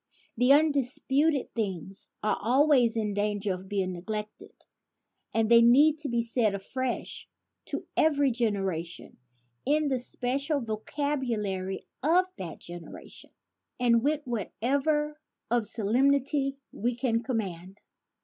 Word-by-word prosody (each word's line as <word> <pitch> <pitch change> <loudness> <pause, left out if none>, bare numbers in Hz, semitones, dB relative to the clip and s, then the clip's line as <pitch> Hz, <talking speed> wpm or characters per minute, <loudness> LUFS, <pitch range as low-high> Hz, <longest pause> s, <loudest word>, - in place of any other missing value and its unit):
The 250 +3 +4
un 305 +2 +7
disputed 275 +2 0
things 195 -3 -4 0.2
are 215 - 0
always 250 0 +3
in 210 -2 -1
danger 205 -1 -1
of 185 +1 -9
being 190 -2 -1
neglected; 210 +4 -7 0.7
and 225 -1 +1
they 235 +1 +7
need 290 +6 +6
to 295 -2 -3
be 235 -1 0
said 230 -3 +1
afresh 255 +6 -4 0.4
to - - -4
every 285 -3 +3
generation, 195 -8 -2 0.5
in 295 +2 +2
the 260 -2 0
special 275 +5 -1
vocabulary 220 -5 -3 0.2
of 340 +6 +4
that 175 -3 -6
generation 175 -1 -10 0.5
and 235 -2 +4
with 295 +3 +1
whatever 280 +7 -1 0.3
of 235 -3 +2
solemnity 275 +5 +1
we 240 +3 -2
can 235 -2 0
command. 195 -6 -4
235 Hz, 120 wpm, -28 LUFS, 205-280 Hz, 0.7 s, un